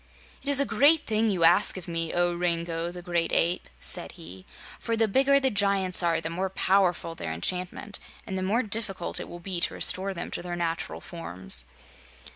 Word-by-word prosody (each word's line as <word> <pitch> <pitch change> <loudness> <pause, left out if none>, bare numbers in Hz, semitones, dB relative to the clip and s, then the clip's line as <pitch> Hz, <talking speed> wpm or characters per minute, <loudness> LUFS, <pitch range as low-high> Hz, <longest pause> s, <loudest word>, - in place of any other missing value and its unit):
"It 285 - -5
is 280 -1 +5
a 280 - +4
great 285 +7 +4
thing 220 0 +1
you 185 -4 0
ask 175 +5 +5
of 185 - -7
me, 165 -1 -2
O 175 0 +1
Rango 170 -1 -2
the 175 0 -9
Gray 170 -2 0
Ape," 170 +1 0
said - - -2
he, 90 +3 -12 0.3
"for 230 -1 -2
the 225 0 +3
bigger 275 +6 +4
the 265 -1 +1
giants 195 -3 +3
are 170 -1 +1
the 160 - -4
more 185 +3 -2
powerful 185 -3 +1
their 85 - -5
enchantment, 180 - -4 0.3
and 190 - -5
the 190 - -2
more 210 +7 +1
difficult 210 -4 -3
it - - -7
will 175 - -8
be 175 0 -4
to - - -1
restore 195 +1 +3
them 170 - -5
to - - -4
their 175 0 -5
natural 170 -1 -3
forms. 95 - -4
180 Hz, 200 wpm, -27 LUFS, 170-205 Hz, 0.3 s, is